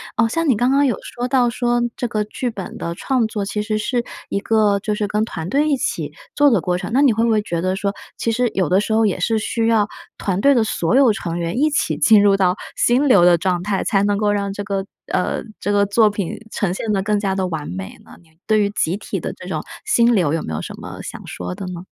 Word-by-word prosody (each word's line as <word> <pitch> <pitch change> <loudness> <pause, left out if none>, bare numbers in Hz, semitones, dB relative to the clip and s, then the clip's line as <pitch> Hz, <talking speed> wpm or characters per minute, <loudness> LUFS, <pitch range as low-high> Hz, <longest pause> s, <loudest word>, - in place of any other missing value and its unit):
啊， 230 - +3
像 330 +7 -1
你 235 - +3
刚 245 +3 +2
刚 280 +1 +4
有 250 - +1
说 245 - -5
到 250 -2 +3
说 240 0 0
这 - - -3
个 210 -1 -1
剧 245 +4 -3
本 195 -5 -7
的 170 - -4
创 255 +4 0
作 210 -2 -3
其 210 +1 -2
实 215 0 -1
是 240 +3 -1 0.2
一 200 - -1
个 210 -1 +2
就 210 - -1
是 210 0 -1
跟 210 +1 0
团 160 -6 -5
队 290 +8 +1
一 285 - +2
起 - - -2 0.2
做 290 -1 +5
的 220 - +3
过 180 +2 -1
程， 180 - -6
那 265 - +4
你 275 -5 +5
会 225 +2 +1
不 235 - +2
会 215 -1 +3
觉 170 -5 -3
得 185 +1 -1
说， 200 0 -1 0.2
其 - - -1
实 245 0 +1
有 185 -4 +1
的 185 +5 +3
时 210 - -4
候 220 0 +3
也 185 -3 -1
是 220 +4 +1
需 225 +1 -1
要 220 -3 +3 0.3
团 195 -1 -1
队 280 +4 +5
的 235 -4 +2
所 195 +2 +1
有 260 -5 +5
成 170 -3 -4
员 170 +4 -2
一 300 +4 +3
起 290 - 0
进 215 -3 +6
入 200 -1 +5
到 185 -2 +2 0.2
心 255 +4 +3
流 200 -10 +6
的 175 -1 +6
状 180 0 -1
态， 195 -1 -1
才 195 -2 +2
能 205 0 +1
够 210 0 +1
让 200 -1 -1
这 205 +1 -5
个 195 -1 -2 0.2
呃 180 - -1 0.2
这 205 - -1
个 200 0 +3
作 210 +2 +4
品 200 -4 -3 0.2
呈 190 -5 -1
现 215 +3 -3
得 195 -2 +1
更 210 +1 +1
加 195 -2 -1
地 190 - 0
完 160 -4 -4
美 95 +1 -6
呢？ - - -18
你 165 - -26 0.2
对 215 -1 +3
于 200 - +1
集 185 -2 -1
体 - - -4
的 - - -4
这 - - -11
种 - - -3 0.2
心 240 - +4
流 170 -7 +2
有 165 - 0
没 80 - -5
有 75 - -3
什 - - -7
么 - - -8
想 - - -7
说 - - -5
的 195 0 -6
呢？ 180 -1 -6
210 Hz, 290 characters per minute, -20 LUFS, 190-235 Hz, 0.3 s, 进